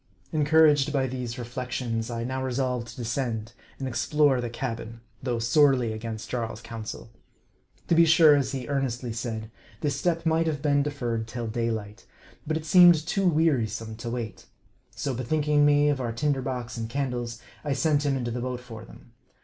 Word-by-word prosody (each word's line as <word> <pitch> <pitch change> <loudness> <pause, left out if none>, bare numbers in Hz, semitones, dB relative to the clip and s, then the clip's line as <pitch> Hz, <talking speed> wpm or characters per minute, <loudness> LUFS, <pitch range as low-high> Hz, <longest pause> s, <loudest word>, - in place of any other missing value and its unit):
Encouraged 150 -2 +4
by 135 -2 +1
these 125 -1 -4
reflections, 120 -1 -3
I 115 -1 -3
now 130 +2 -3
resolved 125 -2 -1
to - - -10
descend, 120 -2 -3 0.2
and 135 - -4
explore 140 +1 +2
the 120 - -3
cabin, 115 -1 -5 0.2
though 125 -2 -1
sorely 125 0 +3
against 110 0 -6
Jarl's 115 -3 -3
counsel. 115 -1 -8 0.8
To - - +2
be 165 0 +6
sure, 160 -2 +7
as 135 -2 0
he 130 -3 -4
earnestly 130 -4 -2
said, 110 -1 -4 0.3
this 145 -3 0
step 165 +3 -1
might 165 0 +2
have 150 -2 -1
been 145 -1 +2
defer 140 -5 -2
red 110 0 -4
till 120 0 -5
daylight; 110 -1 -3 0.4
but 155 +1 0
it 160 - -6
seemed 175 +2 +8
too 195 +2 +1
wearisome 115 -10 +1
to 120 0 -5
wait. 115 -2 -5 0.4
So 140 - -3
bethinking 145 +4 +2
me 145 0 +4
of 140 -3 0
our 120 -2 -2
tinder 140 +2 0
box 125 -2 -4
and 115 -1 -4
candles, 120 -3 -3 0.2
I 145 -2 0
sent 145 +2 +2
him 140 -2 +1
into 120 -2 -3
the 120 +1 -3
boat 125 0 -3
for 115 -3 -10
them. 115 - -16
125 Hz, 180 wpm, -26 LUFS, 115-145 Hz, 0.8 s, seemed